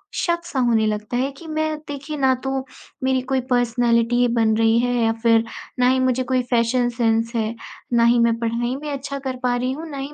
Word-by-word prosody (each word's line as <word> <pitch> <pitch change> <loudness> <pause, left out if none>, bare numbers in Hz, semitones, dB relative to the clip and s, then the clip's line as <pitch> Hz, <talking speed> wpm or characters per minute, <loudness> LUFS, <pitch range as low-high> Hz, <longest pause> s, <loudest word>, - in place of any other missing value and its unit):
शक-सा 340 -5 -1
होने 230 -2 +3
लगता 215 +3 -2
है 270 +3 0
कि 335 - -12
मैं 310 0 -1
देखिए 290 +1 -6
ना 265 -2 +3
तो 270 - -2 0.5
मेरी 260 0 +2
कोई 265 - +2
पर्सनैलिटी 240 0 +2
बन 225 -2 +2
रही 225 0 +3
है 245 +1 0
या 225 - +3
फिर 230 -1 +4 0.4
ना 250 - +4
ही 260 0 +2
मुझे 255 0 +1
कोई 255 0 +1
फैशन 240 +1 +2
सेंस 230 -1 0
है, 225 0 -1 0.4
ना 235 -1 +4
ही 235 +1 +4
मैं 235 0 +3
पढ़ने 235 +2 -1
में 295 +2 -6
अच्छा 280 0 -5
कर 265 -1 -4
पा 245 -1 +2
रही 250 +1 -1
हूँ, 315 +5 -6
ना 285 - -7
ही 275 +2 -6
245 Hz, 215 wpm, -21 LUFS, 230-270 Hz, 0.5 s, फिर